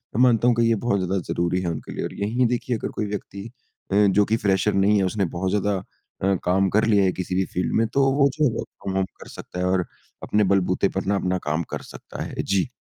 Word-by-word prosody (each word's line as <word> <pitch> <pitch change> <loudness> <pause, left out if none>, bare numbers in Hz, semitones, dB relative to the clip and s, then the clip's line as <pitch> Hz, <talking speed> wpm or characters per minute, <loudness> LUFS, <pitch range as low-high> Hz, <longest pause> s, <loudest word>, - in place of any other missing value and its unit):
मैं 120 - +2
मानता 120 -1 +4
हूँ 120 - +4
कि 120 - +2
ये 115 - +3
बहुत 105 -2 0
ज़्यादा 95 +1 -1
ज़रूरी 85 +1 0
है 90 - -2
उनके 80 - -6
लिए - - -4
और - - -6
यहीं 115 +5 0
देखिए, 120 0 -1
अगर - - -4
कोई 105 - -1
व्यक्ति 100 +1 -6 0.4
अ, - - +1
जो 100 +1 +3
कि 110 +2 +1
फ्रेशर 100 0 +1
नहीं 100 +2 +3
है, 100 - +2
उसने 95 +1 0
बहुत 95 +1 -1
ज़्यादा 105 0 +1 0.5
अ, 95 0 +3
काम 95 +2 +2
कर 110 +4 +2
लिया 105 -3 +4
है 95 - +3
किसी 90 0 -4
भी 95 - +1
फ़ील्ड 90 - -1
में, 115 - +3
तो 135 +5 +1
वो 140 -1 +4
जो 155 - +3
है, 130 - +3
वर्क - - -4 0.2
फ्रॉम 95 - -3
होम 95 - +2 0.2
कर - - -10
सकता 90 - -8
है 90 - 0
और 90 -1 +1 0.4
अपने 105 0 +2
बलबूते 95 0 +2
पर 95 - -1
ना 100 +1 +1
अपना 95 -1 0
काम 80 +3 0
कर - - -3
सकता - - -7
है। - - -4
जी। 100 +3 0
100 Hz, 260 wpm, -23 LUFS, 95-110 Hz, 0.5 s, मानता